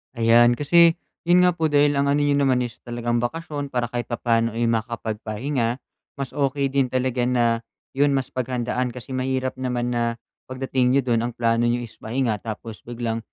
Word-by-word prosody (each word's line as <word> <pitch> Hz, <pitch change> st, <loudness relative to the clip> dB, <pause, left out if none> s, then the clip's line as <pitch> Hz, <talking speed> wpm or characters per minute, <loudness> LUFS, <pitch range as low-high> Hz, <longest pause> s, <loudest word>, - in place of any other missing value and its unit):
Ayan, 120 Hz, +1 st, +5 dB
kasi 165 Hz, +4 st, +5 dB, 0.3 s
'yon 180 Hz, +1 st, +6 dB
nga 180 Hz, -, +5 dB
po 160 Hz, -2 st, 0 dB
dahil 145 Hz, 0 st, +4 dB
ang 140 Hz, -, +2 dB
ano 145 Hz, +1 st, +2 dB
n'yo 145 Hz, -1 st, +2 dB
naman 130 Hz, -3 st, +2 dB
is 120 Hz, -2 st, -7 dB
talagang 120 Hz, 0 st, -1 dB
bakasyon 145 Hz, +3 st, -3 dB
para 120 Hz, -3 st, -2 dB
kahit 120 Hz, -1 st, -3 dB
papa'no, 115 Hz, -1 st, 0 dB
eh, 120 Hz, -, 0 dB
makapagpahinga. 115 Hz, +2 st, -2 dB, 0.4 s
Mas 140 Hz, -2 st, -5 dB
okey 140 Hz, -1 st, 0 dB
din 135 Hz, -2 st, +2 dB
talaga 125 Hz, -1 st, 0 dB
na 120 Hz, -2 st, +2 dB, 0.3 s
'yon, 140 Hz, 0 st, +2 dB
mas 135 Hz, -, -2 dB
paghandaan 125 Hz, 0 st, -2 dB
kasi 125 Hz, +2 st, -9 dB
mahirap 130 Hz, 0 st, -2 dB
naman 125 Hz, -1 st, -1 dB
na 120 Hz, -1 st, 0 dB, 0.3 s
pagdating 130 Hz, 0 st, 0 dB
n'yo 140 Hz, -, +4 dB
do'n, 120 Hz, -3 st, +1 dB
ang 120 Hz, -, -6 dB
plano 115 Hz, 0 st, +2 dB
n'yo 120 Hz, 0 st, 0 dB
is 115 Hz, -, -12 dB
pahinga 115 Hz, -2 st, -1 dB
tapos 110 Hz, -2 st, -7 dB
biglang 115 Hz, -1 st, -3 dB
125 Hz, 180 wpm, -23 LUFS, 115-135 Hz, 0.4 s, yon